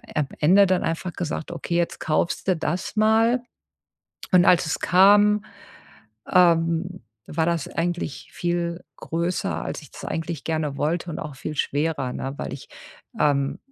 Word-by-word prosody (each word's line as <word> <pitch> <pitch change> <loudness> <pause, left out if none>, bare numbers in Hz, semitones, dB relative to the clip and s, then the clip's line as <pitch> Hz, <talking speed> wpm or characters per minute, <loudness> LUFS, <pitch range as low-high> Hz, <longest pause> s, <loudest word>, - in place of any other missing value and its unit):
am 150 -3 +1
Ende 190 +6 +6
dann 185 -1 +1
einfach 165 +2 -3
gesagt: 165 -1 -4
„Okay, 170 0 -4
jetzt 170 - -1
kaufst 160 +4 -1
du 185 - +3
das 170 +6 -3
mal.” 225 +3 +3 0.9
Und 180 0 +6
als 175 -2 +4
es - - -1
kam, 205 +3 +5 0.9
ähm, 170 -1 +3 0.2
war 160 +1 -1
das 170 -4 -1
eigentlich 170 -3 -3
viel 175 0 -2
größer, 170 +2 -2
als - - -5
ich 150 - -15
das - - -10
eigentlich 165 -3 -4
gerne 155 -3 -2
wollte 170 +4 -1
und - - -5
auch 150 -3 -7
viel 155 +3 -5
schwerer, 145 -4 -1
ne? 135 +1 -4
Weil - - -5
ich 135 - -9 0.5
ähm, 140 -2 +1
170 Hz, 155 wpm, -24 LUFS, 155-180 Hz, 0.9 s, Ende